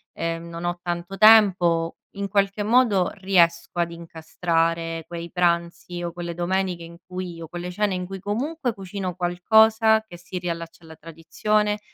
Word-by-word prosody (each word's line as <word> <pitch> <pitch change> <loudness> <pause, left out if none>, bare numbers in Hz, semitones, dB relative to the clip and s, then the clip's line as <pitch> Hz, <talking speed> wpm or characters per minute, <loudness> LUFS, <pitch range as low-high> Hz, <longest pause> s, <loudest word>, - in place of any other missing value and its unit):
e 165 0 -2
non 170 0 -8
ho 175 0 -2
tanto 175 +2 -4
tempo, 185 -7 +5 0.2
in 200 0 -2
qualche 200 +1 0
modo 210 -4 +3
riesco 175 -3 +2
ad 170 0 +1
incastrare 165 0 -2
quei 170 -1 -7
pranzi 170 0 -1
o 170 - -3
quelle 170 0 -6
domeniche, 180 0 -1
in 170 0 -11
cui 180 -1 -6
io 165 -1 -9
quelle 175 +2 -6
cene 205 +1 0
in 180 0 -3
cui 195 +1 -7
comunque 245 - -2
cucino 190 -2 -5
qualcosa 220 +5 +4
che 175 -6 -13
si 180 +1 -7
riallaccia 170 -1 -5
alla 160 0 -12
tradizione, 210 +7 -1
175 Hz, 155 wpm, -24 LUFS, 170-200 Hz, 0.2 s, tempo